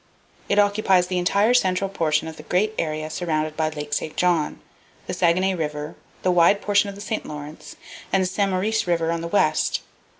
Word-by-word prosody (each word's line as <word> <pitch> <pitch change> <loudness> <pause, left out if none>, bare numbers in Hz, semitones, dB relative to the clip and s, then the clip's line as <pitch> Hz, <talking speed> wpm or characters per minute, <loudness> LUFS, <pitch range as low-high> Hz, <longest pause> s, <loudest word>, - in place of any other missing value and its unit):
It 200 - +2
occupies 205 -3 +3
the 180 0 -1
entire 200 +6 +3
central 190 -5 +2
portion 160 -5 0
of 160 - -7
the - - -9
great 210 +4 +1
area 155 -1 -2
surrounded 155 -2 -2
by 155 -1 0
Lake 150 -1 -6
St. 155 - -2
John, 175 -4 +1 0.5
the - - -4
Saguenay 185 +3 +2
River, 150 -3 -4 0.3
the 185 - +3
wide 175 +3 +4
portion 205 0 +2
of 200 - -8
the 200 - -10
St. 215 +1 -3
Lawrence, 150 0 -9 0.4
and 195 -1 +3
the - - 0
St. 200 +2 0
Maurice 200 +3 0
River 165 -1 +1
on 170 0 -2
the 170 - -4
west. 200 +4 +1
180 Hz, 195 wpm, -23 LUFS, 155-200 Hz, 0.5 s, wide